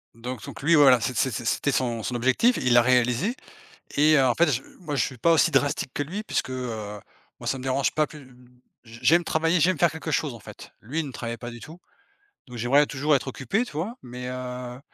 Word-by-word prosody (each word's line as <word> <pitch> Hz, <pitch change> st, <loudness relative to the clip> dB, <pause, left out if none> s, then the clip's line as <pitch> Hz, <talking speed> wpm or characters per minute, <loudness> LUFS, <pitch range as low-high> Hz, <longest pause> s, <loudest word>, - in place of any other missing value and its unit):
Donc 120 Hz, 0 st, -6 dB
donc -, -, -9 dB
lui 165 Hz, +4 st, +4 dB
voilà 135 Hz, -5 st, +6 dB
c'est 125 Hz, -, -2 dB
c'est 130 Hz, -, +2 dB
c'était 120 Hz, +6 st, -1 dB
son 120 Hz, -3 st, -1 dB
son 120 Hz, +3 st, -4 dB
objectif. 130 Hz, -, +2 dB
Il 125 Hz, -, +1 dB
l'a 120 Hz, -, +7 dB
réalisé 125 Hz, -, +2 dB, 0.6 s
et 150 Hz, +2 st, +5 dB
heu, 135 Hz, -, +4 dB
en 125 Hz, -, +2 dB
fait 170 Hz, -2 st, +3 dB
j 125 Hz, -, -1 dB, 0.2 s
moi 155 Hz, -4 st, -5 dB
je 135 Hz, -, +2 dB
suis 130 Hz, -, -6 dB
pas 165 Hz, +8 st, +3 dB
aussi 165 Hz, +1 st, +4 dB
drastique 140 Hz, -1 st, +1 dB
que 145 Hz, -, -1 dB
lui 185 Hz, +9 st, -5 dB
puisque, 215 Hz, -, -2 dB
heu, 110 Hz, -5 st, -5 dB, 0.4 s
moi -, -, -9 dB
ça 135 Hz, -, 0 dB
me 130 Hz, -, -8 dB
dérange 135 Hz, +1 st, 0 dB
pas 155 Hz, -1 st, +2 dB
plus 150 Hz, -3 st, -13 dB, 0.6 s
j 115 Hz, +1 st, -13 dB
j'aime 170 Hz, +3 st, +4 dB
travailler 165 Hz, +3 st, +1 dB
j'aime 180 Hz, +4 st, +2 dB
faire 170 Hz, -3 st, +4 dB
quelque 160 Hz, 0 st, -6 dB
chose 145 Hz, -3 st, -1 dB
en -, -, -10 dB
fait. -, -, -12 dB
Lui 140 Hz, +9 st, -3 dB
il 155 Hz, -, -3 dB
ne 135 Hz, -, -8 dB
travaillait 115 Hz, -1 st, -5 dB
pas 120 Hz, -, -7 dB
du 120 Hz, 0 st, -10 dB
tout. 165 Hz, +7 st, -12 dB, 0.7 s
Donc 125 Hz, -1 st, -10 dB
j'aimerais 135 Hz, +6 st, +3 dB
toujours 145 Hz, +2 st, +1 dB
être 135 Hz, -, -5 dB
occupé, 135 Hz, -, -1 dB
tu -, -, -12 dB
vois? 180 Hz, -, -4 dB
Mais, 125 Hz, 0 st, -7 dB
heu, 125 Hz, -1 st, -6 dB
135 Hz, 235 wpm, -25 LUFS, 125-155 Hz, 0.7 s, l'a